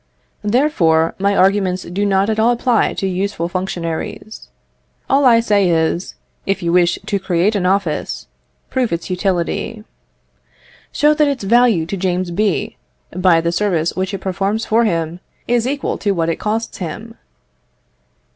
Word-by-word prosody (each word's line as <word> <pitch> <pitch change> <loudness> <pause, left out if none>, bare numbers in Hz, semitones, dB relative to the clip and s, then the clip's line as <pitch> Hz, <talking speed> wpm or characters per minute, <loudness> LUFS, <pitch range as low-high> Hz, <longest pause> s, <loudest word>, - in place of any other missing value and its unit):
Therefore, 205 - +2
my 200 +1 +1
arguments 190 -1 +2
do 200 +4 -2
not 195 0 +2
at 220 0 -1
all 225 +2 +4
apply 245 -1 +1
to - - -2
useful 185 -2 -2
functionaries. 180 +3 -5 0.6
All 275 +1 +3
I 235 -2 +6
say 205 -5 +2
is, 165 +2 0 0.3
if 195 -1 -1
you 170 0 0
wish 175 -1 +3
to 200 - -1
create 185 +3 +1
an 190 -3 0
office, 190 -4 -1 0.5
prove 255 -3 0
its 170 +2 -3
utility. 190 +4 -2 1.1
Show 300 +1 +3
that 300 0 +2
its 275 -6 -2
value 230 -5 +3
to 195 +4 -4
James 180 -1 -1
B., 200 +1 -1 0.4
by 180 -2 +4
the 170 +1 0
services 175 -3 0
which 190 +1 -2
it 195 -2 -5
performs 195 +4 -1
for 230 +2 +2
him, 165 -3 -1 0.3
is 240 0 +1
equal 280 +1 -2
to 205 -2 0
what 165 -2 -1
it 165 - -1
costs 220 +2 -3
him. 215 +6 -6
195 Hz, 155 wpm, -18 LUFS, 175-220 Hz, 1.1 s, I